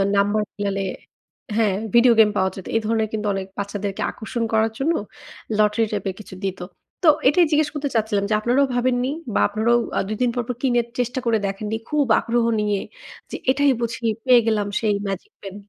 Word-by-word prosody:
Number 205 Hz, +2 st, +2 dB
মিলালে 200 Hz, -1 st, -2 dB, 0.8 s
হ্যাঁ, 210 Hz, -4 st, +2 dB, 0.2 s
video 235 Hz, 0 st, +6 dB
game 215 Hz, -1 st, +7 dB
পাওয়া 190 Hz, 0 st, +2 dB
যেত। 190 Hz, -, -9 dB
এই -, -, +4 dB
ধরনের 220 Hz, 0 st, +1 dB
কিন্তু 210 Hz, -1 st, -2 dB
অনেক 195 Hz, 0 st, -4 dB
বাচ্চাদেরকে 200 Hz, 0 st, -4 dB
আকর্ষণ 230 Hz, +1 st, -4 dB
করার 220 Hz, 0 st, +3 dB
জন্য 320 Hz, +5 st, +1 dB, 0.6 s
লটারি 215 Hz, +1 st, +3 dB
টাইপের 195 Hz, -2 st, -2 dB
কিছু 190 Hz, -3 st, -10 dB
দিত। 190 Hz, -1 st, -3 dB, 0.4 s
তো -, -, +4 dB, 0.2 s
এটাই 335 Hz, +5 st, +5 dB
জিজ্ঞেস 300 Hz, 0 st, +3 dB
করতে 290 Hz, -1 st, -2 dB
চাচ্ছিলাম 215 Hz, -2 st, +1 dB
যে, -, -, +1 dB
আপনারাও 255 Hz, +5 st, +2 dB
ভাবেননি? 250 Hz, +1 st, +1 dB, 0.2 s
বা, -, -, +2 dB
আপনারাও 220 Hz, +3 st, +2 dB, 0.2 s
আ -, -, +3 dB
২ 215 Hz, -, -3 dB
দিন 245 Hz, -, +3 dB
পরপর 245 Hz, 0 st, -2 dB
কিনে 240 Hz, -3 st, +2 dB, 0.2 s
চেষ্টা 245 Hz, +1 st, -1 dB
করে 230 Hz, -1 st, +3 dB
দেখেননি 210 Hz, +3 st, -3 dB
খুব 300 Hz, -2 st, +2 dB
আগ্রহ 235 Hz, 0 st, 0 dB
নিয়ে 205 Hz, -2 st, 0 dB, 0.5 s
যে, -, -, -4 dB, 0.2 s
"এটাই 285 Hz, 0 st, +3 dB
বুঝি 235 Hz, 0 st, -3 dB, 0.2 s
পেয়ে 250 Hz, -2 st, +7 dB
গেলাম 210 Hz, -2 st, +1 dB
সেই 210 Hz, -2 st, +2 dB
ম্যাজিক 300 Hz, -, -5 dB
পেন।"? 195 Hz, 0 st, -8 dB
220 Hz, 185 wpm, -22 LUFS, 205-245 Hz, 0.8 s, game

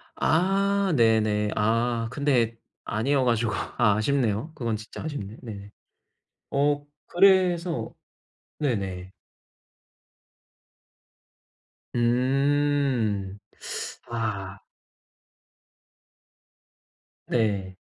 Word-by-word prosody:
아 195 Hz, +2 st, +2 dB
네네. 110 Hz, -3 st, +3 dB
아 115 Hz, +2 st, +1 dB
근데 125 Hz, -5 st, +1 dB, 0.3 s
아니어 130 Hz, +5 st, +1 dB
가지고 115 Hz, -2 st, +1 dB
아 110 Hz, -1 st, +1 dB
아쉽네요. 120 Hz, +2 st, 0 dB
그건 115 Hz, -6 st, -2 dB
진짜 110 Hz, +1 st, -9 dB
아쉽네. 120 Hz, -9 st, -5 dB
네. 100 Hz, -4 st, -8 dB, 0.8 s
어 145 Hz, +1 st, +1 dB, 0.2 s
그래서 175 Hz, -, +3 dB, 0.7 s
네네. 95 Hz, -9 st, -2 dB, 2.8 s
음. 125 Hz, -4 st, +1 dB, 0.7 s
아. 105 Hz, -4 st, -3 dB, 2.7 s
네. 100 Hz, -5 st, 0 dB
120 Hz, 115 characters per minute, -26 LUFS, 105-145 Hz, 2.8 s, 네네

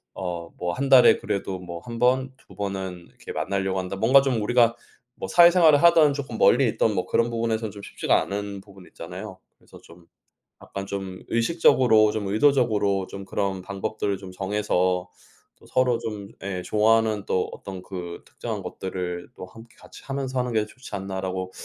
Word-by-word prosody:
어 85 Hz, -3 st, -5 dB
뭐 90 Hz, 0 st, -2 dB
'1 140 Hz, +1 st, -2 dB
달에 130 Hz, -2 st, +7 dB
그래도 95 Hz, -1 st, -3 dB
뭐 85 Hz, -1 st, -8 dB
1 115 Hz, -1 st, -6 dB
번, 130 Hz, +1 st, +2 dB
2 -, -, -18 dB
번은 95 Hz, -3 st, -5 dB
이렇게 -, -, -11 dB
만나려고 95 Hz, -1 st, -1 dB
한다.' 95 Hz, +1 st, -4 dB
뭔가 130 Hz, +7 st, +5 dB
좀 130 Hz, -5 st, 0 dB
우리가 120 Hz, +1 st, +3 dB, 0.4 s
뭐 -, -, -5 dB
사회생활을 170 Hz, -4 st, +6 dB
하든 165 Hz, -3 st, +6 dB
쪼끔 135 Hz, -5 st, -5 dB
멀리 125 Hz, 0 st, +5 dB
있든 110 Hz, 0 st, +1 dB
뭐 90 Hz, -, -1 dB
그런 115 Hz, 0 st, +1 dB
부분에서는 115 Hz, -2 st, -1 dB
좀 100 Hz, -, -11 dB
쉽지가 -, -, +1 dB
않은 100 Hz, 0 st, -5 dB
부분 95 Hz, -2 st, -16 dB
있잖아요. 95 Hz, +3 st, -9 dB, 0.2 s
그래서 -, -, -17 dB
좀 85 Hz, 0 st, -18 dB, 0.6 s
약간 100 Hz, 0 st, -7 dB
좀 95 Hz, -2 st, -6 dB
'의식적으로 115 Hz, -4 st, +4 dB
좀 105 Hz, -2 st, -3 dB
의도적으로 105 Hz, -5 st, +2 dB
좀 100 Hz, 0 st, -8 dB
그런 95 Hz, -1 st, -2 dB
방법들을 100 Hz, +1 st, -3 dB
좀 95 Hz, -2 st, -10 dB
정해서 95 Hz, -2 st, 0 dB, 0.5 s
또 -, -, -21 dB
서로 125 Hz, -2 st, +1 dB
좀 105 Hz, -4 st, -6 dB
예 95 Hz, -2 st, -3 dB
좋아하는 110 Hz, -1 st, +2 dB
또 90 Hz, -, 0 dB
어떤 95 Hz, -2 st, -8 dB
그 90 Hz, -3 st, -7 dB
특정한 -, -, -6 dB
것들을 90 Hz, -2 st, -5 dB
또 -, -, -8 dB
함께 115 Hz, +4 st, -15 dB
같이 -, -, -15 dB
하면서 135 Hz, -1 st, -3 dB
하는 125 Hz, -1 st, -1 dB
게 110 Hz, -1 st, +1 dB
좋지 110 Hz, -1 st, -10 dB
않나.'라고 95 Hz, -1 st, -4 dB
100 Hz, 345 characters per minute, -24 LUFS, 95-120 Hz, 0.6 s, 달에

